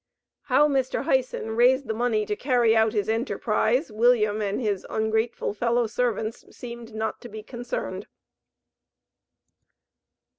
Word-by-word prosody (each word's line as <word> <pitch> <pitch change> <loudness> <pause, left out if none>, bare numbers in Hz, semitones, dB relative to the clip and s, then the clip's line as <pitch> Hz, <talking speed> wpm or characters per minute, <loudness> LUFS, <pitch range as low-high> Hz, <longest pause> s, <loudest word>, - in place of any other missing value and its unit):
How 290 +2 +4
Mr. 270 -3 0
Hyson 255 -6 0
raised 260 +3 +4
the 220 - -1
money 220 -2 0
to 210 - -2
carry 240 -2 +2
out 220 0 +3
his 205 -2 0
enterprise, 230 +3 0
William 215 -1 +3
and 200 -1 -1
his 210 -6 -1
"ungrateful" 220 0 -1
fellow 235 +2 +1
servants 225 -1 -2
seemed 235 -2 -9
not 220 0 -3
to 240 - -9
be 215 -1 -8
concerned. 245 +1 -5
230 Hz, 125 wpm, -25 LUFS, 220-245 Hz, -, How